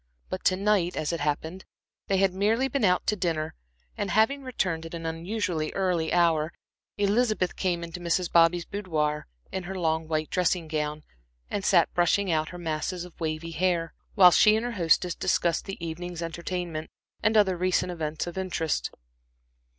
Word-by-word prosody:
But - - -4
to 185 - +4
night, 195 -3 +1
as 155 +2 -1
it 170 - -2
happened, 160 +5 -2 0.4
they 195 - +2
had 190 -1 +3
merely 220 +7 +2
been 270 -2 -1
out 180 -2 +3
to 210 - +1
dinner, 160 -5 -1 0.4
and 200 - -2
having 220 +9 +3
returned 185 -11 -2
at 165 - -8
an 165 -1 -6
unusually 165 -1 -2
early 180 -4 0
hour, 165 -2 +2 0.4
Elizabeth 205 -2 +1
came 175 -3 -1
into 170 +1 -6
Mrs. 175 +1 0
Bobby's 170 0 +4
boudoir 155 -7 -2 0.2
in 190 -1 -4
her 190 +1 -5
long 160 -2 0
white 155 -1 -2
dressing 180 -2 +1
gown, 150 -1 -2 0.5
and 200 - -2
sat 175 -4 +3
brushing 175 +2 +2
out 155 -1 +1
her 175 - -8
masses 170 +2 -3
of 180 - -13
wavy 160 0 -3
hair, 170 0 0 0.2
while 180 -3 +8
she 210 +4 +6
and 220 +2 -1
her 245 - -2
hostess 175 -3 +2
discussed 170 -1 0
the 195 - -6
evening's 170 +1 -5
entertainment, 170 -1 -4 0.3
and 220 +2 +3
other 195 -3 +4
recent 180 0 +1
events 160 -2 -3
of 175 +2 -5
interest. 170 -4 -1
175 Hz, 175 wpm, -27 LUFS, 160-190 Hz, 0.5 s, while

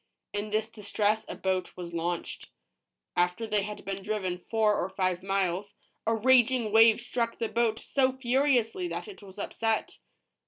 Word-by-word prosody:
In 205 +1 -3
this 215 +1 0
distress 215 0 -1
a - - -4
boat 185 -1 -2
was 175 -1 -7
launched. 170 +1 -3 0.7
After 180 +5 +1
they 210 -2 +1
had 210 +1 -6
been 195 0 -4
driven 190 -3 -2
four 220 -2 +3
or 185 - -3
five 185 -2 -1
miles, 195 0 -1 0.3
a 225 - +3
raging 245 -1 +4
wave 225 0 +7
struck 235 -1 -2
the 230 - -1
boat 230 -1 +1
so 260 +2 +1
furiously 260 +3 +1
that - - -5
it 410 - -11
was 195 -1 -13
upset. 225 +2 -2
215 Hz, 160 wpm, -29 LUFS, 190-230 Hz, 0.7 s, wave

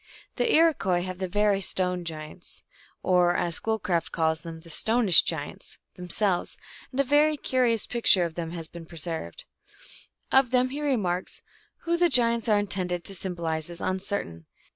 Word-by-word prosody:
The 470 - +2
Iroquois 240 - +3
have 185 0 -6
the 190 - -2
very 205 +1 +2
stone 180 -1 -1
giants 155 +2 -6 0.4
or, 180 -1 +3
as 170 -1 0
Schoolcraft 185 -5 -1
calls 160 -1 0
them, 165 -1 -8
the 165 - -12
stonish 220 0 +5
giants 150 -4 -4 0.2
them 180 0 -9
selves, 190 -2 0 0.3
and 265 - -5
a - - +5
very 295 +3 +3
curious 245 -5 +1
picture 215 -7 +4
of 165 - -5
them 165 -1 -4
has 165 -1 -6
been 165 0 -11
preserved. 160 - -5 0.9
2 - - +5
Of 265 -2 +5
them 255 0 +2
ho 285 - -4
remarks, 205 -11 -1 0.4
"Who 340 0 +1
the 350 0 +3
giants 235 -3 +3
are 210 - +5
intended 185 -4 -2
to 195 - -2
symbolize 170 -4 -2
is 170 0 -6
uncertain. 185 - -3
185 Hz, 165 wpm, -26 LUFS, 170-230 Hz, 0.9 s, stonish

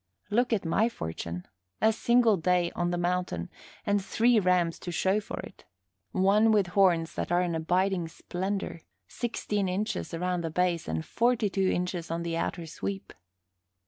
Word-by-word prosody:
Look 245 +4 +2
at 210 -6 +1
my 210 +8 +2
fortune! 85 - -5 0.3
A 220 - +4
single 235 -1 +4
day 180 0 +1
on 175 0 -1
the 175 - -1
mountain, 175 - -1 0.3
and 205 -1 +1
three 230 +3 +3
rams 180 -3 +2
to 175 - -5
show 190 +4 +2
for 210 - -7
it; - - -12 0.5
one 205 +4 +4
with 205 -4 +3
horns 175 -5 +3
that - - -3
are 175 +1 +4
an 175 -2 -1
abiding 180 +2 +1
splendor 190 +1 -4 0.3
sixteen 210 - -2
inches 205 +4 -2
around 180 +1 -1
the 165 - -2
base 175 0 0
and 80 0 -2
forty 235 -3 +1
two 195 -1 +1
inches 180 -2 -2
on 165 +1 -2
the 170 -1 -2
outer 170 0 -2
sweep. 195 +4 -5
180 Hz, 165 wpm, -28 LUFS, 170-205 Hz, 0.5 s, A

